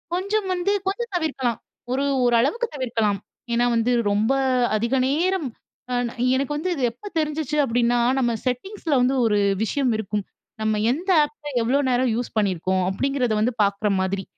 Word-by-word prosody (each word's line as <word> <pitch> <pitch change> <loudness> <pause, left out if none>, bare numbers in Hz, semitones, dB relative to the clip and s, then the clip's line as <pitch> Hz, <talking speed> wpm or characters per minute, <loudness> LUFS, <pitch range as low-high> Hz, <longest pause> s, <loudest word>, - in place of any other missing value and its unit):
கொஞ்சம் 400 +2 -1
வந்து 360 +2 0 0.2
கொஞ்சம் 465 +4 -2
தவிர்க்கலாம். 275 -8 -1 0.4
ஒரு 270 +2 0 0.2
ஒரு 240 -1 +3
அளவுக்கு 465 - 0
தவிர்க்கலாம். 225 -7 0 0.3
ஏன்னா 240 +1 +3
வந்து 230 +2 +1 0.2
ரொம்ப 210 +4 +2 0.5
அதிக 235 +4 0
நேரம் 330 +1 0 0.4
அ - - 0
நா 235 - -7 0.2
எனக்கு 275 +2 -1
வந்து 345 +5 -2
இது 275 - -3
எப்போ 330 - -12
தெரிஞ்சுச்சு 300 -1 -2
அப்டின்னா, 240 -1 +2 0.2
நம்ம 245 -3 +2
"EN" - - -15
செட்டிங்ஸில 315 - -2
வந்து 255 +2 +2
ஒரு 210 -2 +2 0.3
விஷயம் 255 +3 0
இருக்கும். 210 -1 -2 0.4
நம்ம 215 -1 +1
எந்த 340 +9 -3
ஆப்ப, 295 0 -7 0.2
எவ்வளோ 250 +5 +2
நேரம் 250 0 +2
யூஸ் 245 +1 -2
பண்ணியிருக்கோம். 185 -2 +1
அப்டிங்கிறத 255 +3 0
வந்து 230 +4 +2
பாக்கிற 200 +1 0
மாதிரி. 190 +1 -1
250 Hz, 165 wpm, -23 LUFS, 225-300 Hz, 0.5 s, ஒரு